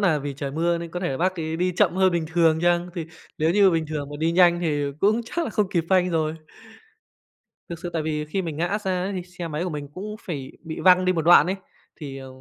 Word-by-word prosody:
là 175 -7 +3
vì 145 -1 -5
trời 140 0 -4
mưa 170 +3 0
nên 170 -1 -7
có 180 - -5
thể 180 - -1
là 135 - -2
bác 185 +4 0
ấy 160 0 -3
đi 180 +2 0
chậm 180 - +3
hơn 190 -1 +4
bình 170 -2 0
thường 160 -1 +3
chăng, 175 0 +2
thì 170 -4 -4 0.3
nếu 160 +1 +2
như 195 +1 +5
bình 165 -2 0
thường 150 -2 -4
mà 145 - -6
đi 165 +2 +1
nhanh 175 -1 +5
thì 150 -4 0 0.2
cũng 215 +4 +3
chắc 340 +8 -2
là - - -4
không 210 -2 0
kịp 170 -5 0
phanh 180 -1 +3
rồi. 160 -2 0 1.3
Thực 170 -1 -6
sự 175 0 -6
tại 165 - -1
vì 150 -1 -2
khi 170 +6 -2
mình 165 -4 -5
ngã 170 +3 0
ra 185 -3 -2
ấy 195 +2 -2
thì 185 -2 -3
xe 180 -1 -7
máy 155 +2 -3
của 185 - -3
mình 145 -2 -5
cũng 210 +3 -6
phải 140 -7 -6
bị 160 -1 -6
văng 185 0 +5
đi 185 - +3
một 165 -3 -1
đoạn 175 +2 +7
ấy, 190 +2 -1 0.4
thì, 140 -3 -7
à, 135 - -9
170 Hz, 270 wpm, -24 LUFS, 155-185 Hz, 1.3 s, đoạn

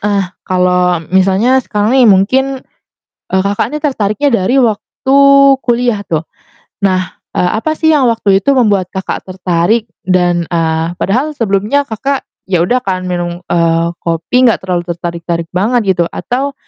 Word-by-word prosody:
ah 200 -1 0 0.2
kalau 180 -1 +1
misalnya 195 +8 +3
sekarang 210 0 -1
nih 255 -3 +5
mungkin, 205 +7 +3 0.9
eee, 190 - +1
Kakak 200 +2 0
ini 300 - -2
tertariknya 270 -1 0 0.2
dari 250 - +1
waktu 255 +4 0 0.5
kuliah 240 -3 +1
tuh. 160 -1 -1 0.6
Nah, 185 -2 0 0.2
eee, 180 - +1
apa 310 +7 -1
sih 315 0 +1
yang 290 -4 +3
waktu 215 -4 +2
itu 280 +7 +1
membuat 205 -7 +2
Kakak 190 0 -4
tertarik? 185 +4 0 0.2
Dan, 175 -2 +1
eee, 165 -1 0
padahal 250 - -1
sebelumnya 215 +5 0
Kakak 270 +5 -2 0.2
ya 185 -3 +1
udah 245 +8 +1
kan 185 -1 -2
minum, 175 0 -3
eee, 165 -1 +2
kopi 170 +10 0
gak 230 - +1
terlalu 180 -2 -1
tertarik-tarik 170 0 -4
banget 200 +1 +1
gitu, 175 - +3
atau 270 +3 -3
195 Hz, 150 wpm, -13 LUFS, 180-245 Hz, 0.9 s, nih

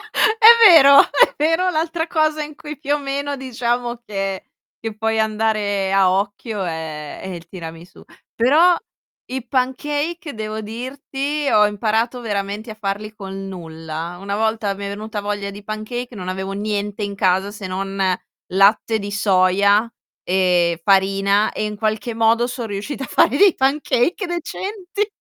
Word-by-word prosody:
È 440 +1 +2 0.2
vero, 280 -6 +9
è 285 - +3
vero 330 +5 +2
l'altra 325 0 -1
cosa 310 -2 +1
in 300 0 -7
cui 300 0 -9
più 290 -1 0
o - - 0
meno 280 0 -3
diciamo 240 -2 -2
che 195 -3 -4 0.4
che 225 -1 -3
puoi 225 0 0
andare 215 -3 0
a 195 -2 +4
occhio 200 +2 -2
è 160 -3 -6
è - - -8
il 170 -2 -8
tiramisù. 165 -1 -10 0.3
Però 305 +10 +5 0.5
i 255 -1 -5
pancake, 290 +5 -2
devo 215 0 -4
dirti, 275 +6 -4
ho 210 0 +5
imparato 220 +4 -1
veramente 205 0 -4
a - - -6
farli 210 +1 -4
con 195 -2 -7
nulla. 165 -1 -7
Una 200 0 -3
volta 220 -2 0
mi 200 +1 -7
è - - -3
venuta 210 +1 -5
voglia 205 -1 -3
di 200 +1 -11
pancake, 235 +4 -5
non 185 -3 -7
avevo 190 +1 -4
niente 205 0 -3
in 200 -1 -3
casa, 190 0 +1
se 205 -1 -8
non 195 +1 -4 0.5
latte 205 +3 +3
di 200 0 -5
soia 200 +2 +3 0.3
e 180 -2 +2
farina 195 +1 +3
e - - -3
in 210 0 -4
qualche 215 +1 -2
modo 230 +1 +3
son 245 -1 -5
riuscita 215 +7 -5
a - - -7
fare 260 - +3
dei 395 -2 +6
pancake 285 - +1
decenti. 380 +4 -4
215 Hz, 155 wpm, -20 LUFS, 195-265 Hz, 0.5 s, vero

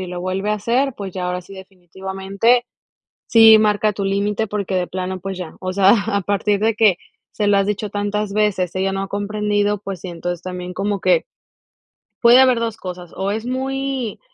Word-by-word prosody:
y 185 - -4
lo 180 0 -6
vuelve 190 +3 -2
a - - +2
hacer, 240 +6 0
pues, 195 -3 -6
ya 180 -1 -3
ahora 180 0 -3
sí, 195 +3 -13
definitivamente, 190 +5 -1 0.6
sí 225 -1 +8
marca 215 0 +2
tu 200 -1 -4
límite 205 +2 0
porque 200 -2 -3
de 180 -1 0
plano, 185 0 -4
pues 190 0 -5
ya, 180 -3 -7
o 185 0 -4
sea, 195 0 +4 0.2
a 200 -2 0
partir 200 +1 0
de 225 0 +2
que 210 -5 +4 0.3
se 210 - -1
lo 205 -1 +4
has 195 0 +1
dicho 210 0 -2
tantas 205 0 -2
veces, 200 -4 0
ella 190 +1 0
no 195 - -2
ha - - -5
comprendido, 205 0 -1
pues 195 -3 -5
sí, - - -7
entonces 175 0 -5
también 180 0 -6
como 200 0 -2
que - - +3 1.0
puede 240 +1 +7
haber 255 -2 +5
2 230 -1 -3
cosas 180 -3 -8
o 195 +1 -1
es 220 +2 -3
muy 265 -2 -3
200 Hz, 200 wpm, -20 LUFS, 185-215 Hz, 1.0 s, sí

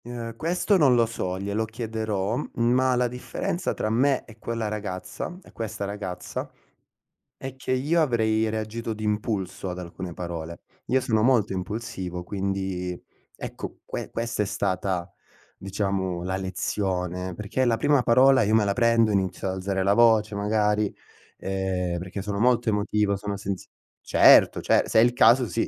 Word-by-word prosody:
Ehm, 120 -1 -6
questo 180 - +1
non 140 -7 +5
lo 120 -1 +4
so, 95 -5 -3
glielo 100 +3 -1
chiederò, 110 -2 -2 0.2
ma 125 +2 +3
la 125 0 +2
differenza 125 +8 -3
tra 110 - -1
me 130 +3 +2
e 115 -1 -15
quella 115 -1 -3
ragazza 105 - -5
e - - -17
questa 110 -2 -4
ragazza, 100 -3 -5 0.8
è 135 0 -7
che 130 -1 -5
io 145 +6 +2
avrei 110 -5 +2
reagito 110 +1 -3
d'impulso 105 -3 -2
ad 90 - -6
alcune 90 0 -7
parole. 85 -1 -6 0.3
Io 130 +1 +2
sono 110 -3 +1
molto 115 -5 +3
impulsivo, 95 -3 -4
quindi 95 -2 -3 0.4
ecco, - - -7
que - - -6
questa 115 -2 -1
è - - -2
stata 95 -3 -2 0.5
diciamo, 95 -2 -2
la 95 +1 -2
lezione, 95 -1 -2
perché 105 +7 -1
la 115 -2 +2
prima 145 -2 +3
parola, 130 +2 +5
io 105 +1 +1
me 110 -1 +5
la 100 -1 +1
prendo, 115 0 +3
inizio 95 -1 -1
ad 95 - -2
alzare 95 0 -2
la 100 +2 +3
voce 110 -2 +4
magari, 105 0 +1 0.4
ehm, 95 -2 -2
perché 95 +3 -6
io - - -4
sono 100 0 -3
molto 120 0 +3
emotivo, 105 -1 +1
sono 100 0 -4
sensi 100 -2 -5 0.4
certo - - +6
cer - - +3
se - - +4
è - - +8
il 120 0 +3
caso 120 +1 +5
sì, 115 - -1
105 Hz, 160 wpm, -25 LUFS, 95-115 Hz, 0.8 s, è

